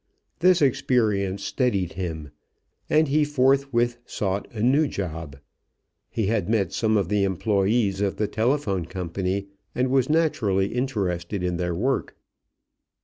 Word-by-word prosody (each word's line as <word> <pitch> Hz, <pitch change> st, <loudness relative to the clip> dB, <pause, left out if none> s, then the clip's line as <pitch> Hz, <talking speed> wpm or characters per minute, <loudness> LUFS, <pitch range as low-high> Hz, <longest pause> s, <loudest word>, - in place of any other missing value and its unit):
This 180 Hz, -1 st, +4 dB
experience 105 Hz, -7 st, +1 dB
steadied 100 Hz, -, 0 dB
him, 80 Hz, -5 st, -5 dB, 0.6 s
and 155 Hz, +1 st, +4 dB
he 150 Hz, +2 st, +3 dB
forthwith 135 Hz, -4 st, +2 dB
sought 100 Hz, -4 st, -3 dB
a 110 Hz, -2 st, -4 dB
new 140 Hz, +5 st, +4 dB
job. 80 Hz, -, -5 dB, 0.7 s
He 110 Hz, -, -1 dB
had 105 Hz, 0 st, 0 dB
met 100 Hz, -6 st, +1 dB
some 110 Hz, -1 st, +1 dB
of 100 Hz, -4 st, 0 dB
the 105 Hz, +1 st, +1 dB
employees 100 Hz, +1 st, +1 dB
of 100 Hz, -1 st, 0 dB
the 105 Hz, -, -1 dB
telephone 110 Hz, -, 0 dB
company 95 Hz, +2 st, -3 dB, 0.3 s
and 130 Hz, +1 st, +1 dB
was 130 Hz, 0 st, +2 dB
naturally 105 Hz, -, +1 dB
interested 100 Hz, -7 st, -2 dB
in 90 Hz, -1 st, -1 dB
their 90 Hz, -1 st, -2 dB
work. 130 Hz, +9 st, -1 dB
105 Hz, 135 wpm, -24 LUFS, 95-125 Hz, 0.7 s, This